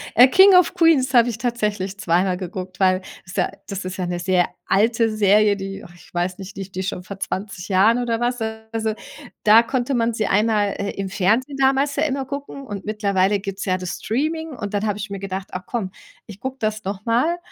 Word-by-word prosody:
äh, 245 +3 +9
„King 380 +6 +7
of 360 -1 +5
Queens“ 300 -6 +3
habe 240 -1 +5
ich 230 - -4
tatsächlich 210 -5 -2
zweimal 180 -1 +1
geguckt, 185 0 -7
weil 185 -1 +3 0.2
ist 175 - -10
ja - - +2 0.2
das 195 -1 -5
ist 185 0 -5
ja 185 - -2
'ne 175 0 -3
sehr 180 0 +2 0.2
alte 225 +3 +2
Serie, 210 0 +4
die 195 0 -6
och 175 - -13
ich 165 0 -19
weiß 180 +1 -1
nicht, 195 0 -9
die 195 -1 -6
die 185 - -4
ich 190 - -3
schon 180 - -6
vor 195 +1 -9
20 195 -1 -5
Jahren 205 +5 +4
oder 230 -2 -1
was, 245 0 -1
äh 220 0 -3
also, 220 -1 -1 0.5
da 215 +2 +7
konnte 255 +2 -1
man 235 -1 +1
sie 215 -2 -1
einmal, 210 0 +2
äh, 200 0 -3
im 195 0 -4
Fernsehen 220 +9 +1
damals 275 +1 +2
ja 295 - +1
immer 275 -3 -1
gucken 280 0 -7
und 200 -2 -6
mittlerweile 200 -2 +1
gibt's 195 0 -5
ja 185 -1 +1
das 180 -1 -5
Streaming 315 +7 -1
und 205 -7 -6
dann 205 +1 0
hab 205 -1 -1
ich 210 0 -5
mir 200 0 -5
gedacht: 190 0 -5
„Ach, 185 - -5
komm, 215 -6 -3 0.3
ich 205 -2 -11
guck 265 0 -5
das 215 0 -2
nochmal“, 230 - 0
210 Hz, 225 wpm, -21 LUFS, 190-240 Hz, 0.5 s, äh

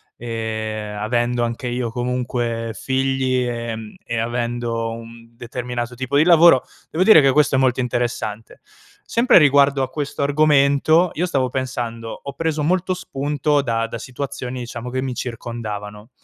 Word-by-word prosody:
e, 110 -2 -4
mhmm, - - -7
avendo 120 +2 0
anche 120 +2 -3
io 120 -1 -2
comunque 120 -1 -2
figli, 130 -1 0
ehm, 115 -2 -5
e 115 - -3
avendo 115 0 -2
un 115 0 -10
determinato 120 0 -5
tipo 130 +3 -1
di 150 - +6
lavoro, 170 -5 +6 0.3
devo 170 +4 +2
dire 190 -6 +8
che 135 -1 +4
questo 150 -1 +3
è - - +3
molto 130 -1 +2
interessante. 120 -3 -3 0.5
Sempre 235 -2 +5
riguardo 140 -2 +5
a 130 - -3
questo 145 -2 -4
argomento, 150 +3 +3
io 175 - 0
stavo 135 -8 0
pensando: 120 -3 -4
ho 140 - -6
preso 160 0 -2
molto 185 +3 +1
spunto 145 -3 -1
da 115 -3 -1
da 115 - -6
situazioni 130 0 -5
diciamo 120 0 -6
che 130 +1 -2
mi 130 -1 -3
circondavano. 110 -3 -6
125 Hz, 150 wpm, -21 LUFS, 115-140 Hz, 0.5 s, dire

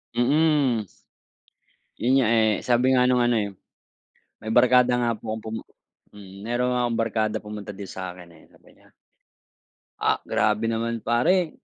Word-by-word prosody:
Mm. 140 -3 +2 1.2
Yun 125 +3 +2
nga, 125 -5 +3
eh. 110 -2 +3
Sabi 125 +2 +3
nga 125 - +4
nung 125 -1 +3
ano, 120 -1 +2
eh, 100 -2 -2 0.9
may 110 - -8
barkada 125 0 +4
nga 120 -1 +1
po 110 0 -5
akong 110 - -10
pumu 110 0 -5 0.5
mm, 100 -1 -12
meron 125 +1 0
nga 125 - 0
akong 115 -1 -2
barkadang 110 -1 -2
pumunta 105 -1 -7
dito 100 -2 -8
sa 95 -2 -6
akin, 90 -1 -13
eh, 80 - -19
sabi - - -23
niya - - -25 1.1
"ah, - - +2
grabe 105 +1 0
naman 115 +1 -1
pare." 155 +9 +2
115 Hz, 160 wpm, -24 LUFS, 105-125 Hz, 1.2 s, nga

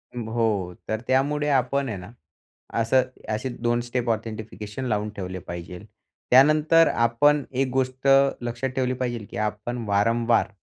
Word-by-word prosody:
ब 115 -2 -5
हो, 105 -6 0
तर 110 0 -2
त्यामुळे 145 +3 +1
आपण 135 0 +1
आहे 105 - -4
ना, 90 +3 -10 0.7
असं 115 +3 +3 0.3
असे 120 +5 -2
2 120 0 +1
स्टेप 120 0 -2
ऑथेंटिफिकेशन 110 +1 -4
लावून 105 -2 -1
ठेवले 95 -1 -5
पाहिजेल, 85 0 -8 0.5
त्यानंतर 155 +5 +6
आपण 120 +5 +3
एक 135 +1 0
गोष्ट 130 +1 -1 0.3
लक्षात 120 +2 -3
ठेवली 130 -1 0
पाहिजेल, 120 -4 -3
की - - -6
आपण 105 +3 -3
वारंवार 115 +3 +2
120 Hz, 140 wpm, -24 LUFS, 105-130 Hz, 0.7 s, त्यानंतर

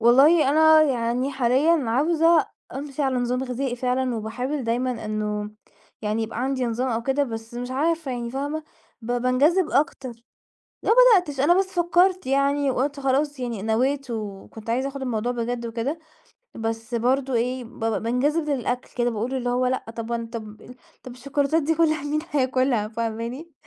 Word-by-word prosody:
والله 275 +6 +6
أنا 315 +1 +6
يعني 250 -1 0
حاليًا 270 +5 +2
عاوزة 325 +5 +3 0.3
أمشي 280 +1 -4
على 265 -2 +1
نظام 250 +1 -1
غذائي 250 0 -3
فعلًا، 250 0 0
وباحاول 250 +6 -3
دايمًا 240 0 -1
إنه 210 -1 -3 0.5
يعني 215 +1 -1
يبقى 225 +1 -4
عندي 260 -1 -1
نظام 240 +3 -1
أو 230 0 -1
كده، 270 +4 +1
بس 225 -1 -7
مش 245 +1 -5
عارفة 315 +2 0
يعني 240 -2 -4
فاهمة، 290 +4 -3 0.4
ب 240 +2 -3
بانجذِب 275 +9 +2
أكتر، 275 -2 0 0.7
ما - - 0
بدأتش 405 - +5
أنا 345 +6 +4
بس 390 - +2
فكّرت 360 0 +2
يعني 275 +1 +2
وقُلت 280 +3 -1
خلاص 275 +1 0
يعني 235 -5 -4
نويت 260 +5 0
وكنت 215 0 -6
عايزة 260 +4 0
آخد 275 0 -7
الموضوع 245 -1 -1
بجد 240 0 -3
وكده، 235 +7 -3 0.6
بس 225 +1 -4
برضه 255 +3 +1
إيه 250 +2 -1
بابقى 225 -3 -3
بانجذب 290 +7 0
للأكل 250 -3 -2
كده، 240 0 +1
باقول 235 +4 -3
اللي 250 -2 -1
هو 250 +1 +1
لأ 255 +1 -1
طَب 230 0 -5
وأنا 230 -1 -2
طَب 215 -2 -8
ال 250 - -12 0.3
طَب 255 - -9
الشوكولاتات 280 +4 0
دي 320 +3 +1
كُلّها 310 -2 +2
مين 295 +1 -1
هياكُلها؟ 255 -5 +1
فاهماني؟ 230 +7 -4
255 Hz, 165 wpm, -24 LUFS, 235-285 Hz, 0.7 s, والله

